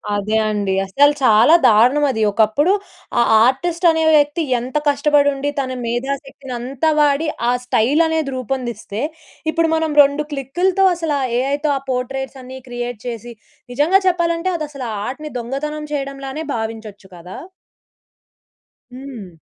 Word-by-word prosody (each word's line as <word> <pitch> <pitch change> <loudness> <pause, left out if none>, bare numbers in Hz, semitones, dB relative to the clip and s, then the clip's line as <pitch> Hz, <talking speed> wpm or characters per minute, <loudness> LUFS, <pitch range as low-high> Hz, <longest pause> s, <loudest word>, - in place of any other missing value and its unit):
అదే 210 +2 -1
అండి. 200 -2 -1
అస్సల 285 +9 +4
చాలా 230 +5 +5
దారుణమది. 250 +3 +3
ఒకప్పుడు 225 - +2 0.5
ఆ - - +5 0.2
ఆర్టిస్ట్ 335 +7 0
అనే 320 0 0
వ్యక్తి 295 +3 +2 0.2
ఎంత 255 +4 -3
కష్టపడి 285 0 +3
ఉండి, 280 +1 -3
తన 260 -1 -2
మేధాశక్తిని 270 +2 -4
అంతా 270 +6 -1
వాడి 295 +2 +2 0.2
ఆ - - +3
స్టైలనేది 300 +5 +1
రూపొందిస్తే. 240 -4 -4 0.5
ఇప్పుడు 330 0 +1
మనం 320 -1 -1
2 285 +2 0
క్లిక్కులతో, 355 +8 0
అసలా 315 -4 -2 0.2
ఏఐ‌తో 285 +3 0
ఆ - - -4
పోర్ట్రెట్స్ 265 +2 -4
అన్ని 260 +1 -9
క్రియేట్ 240 -2 -5
చేసి 235 0 -6 0.4
నిజంగా 320 +9 +3
చెప్పాలంటే, 340 0 0
అదసలా 285 -6 -6
ఆ - - -4
ఆర్ట్‌ని 300 +3 -6
దొంగతనం 300 +5 -4
చేయడంలానే 275 +1 -4
భావించొచ్చు 220 -3 -6
కదా! 180 +2 -10 1.6
హ్మ్. 240 -10 -10
275 Hz, 125 wpm, -19 LUFS, 240-300 Hz, 1.6 s, చాలా